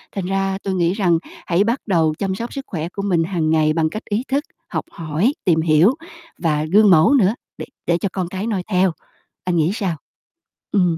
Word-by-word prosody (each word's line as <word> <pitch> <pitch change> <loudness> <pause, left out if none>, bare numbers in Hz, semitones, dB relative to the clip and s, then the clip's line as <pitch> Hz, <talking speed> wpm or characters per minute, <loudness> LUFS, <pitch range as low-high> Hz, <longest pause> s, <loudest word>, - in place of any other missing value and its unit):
Thành 195 -3 -2
ra 195 0 0
tôi 195 - -1
nghĩ 175 -1 +2
rằng 180 -5 +2 0.3
hãy 175 +3 +3
bắt 235 +5 0
đầu 165 -5 +2
chăm 190 -1 -1
sóc 235 +4 -5
sức 275 -1 -5
khỏe 165 -1 -4
của 200 - -5
mình 175 -5 +2
hàng 165 -3 -1
ngày 155 -1 +3
bằng 160 -1 +1
cách 215 - -7
ý 210 +3 -1
thức, 280 +2 0 0.3
học - - -3
hỏi, 165 - 0
tìm 165 -4 +3
hiểu 165 - +4 0.4
và 155 -2 0
gương 205 +6 +5
mẫu 165 - +6
nữa 220 -5 +4 0.2
để - - -6 0.2
để 170 - +3
cho 195 - -2
con 185 -3 -2
cái 190 +4 -4
noi 200 -5 -1
theo. 185 -2 +2 0.5
Anh 180 -1 0
nghĩ 160 +2 +2
sao? 190 -6 -2 0.7
Ừm. 180 -5 +2
185 Hz, 215 wpm, -20 LUFS, 165-200 Hz, 0.7 s, mẫu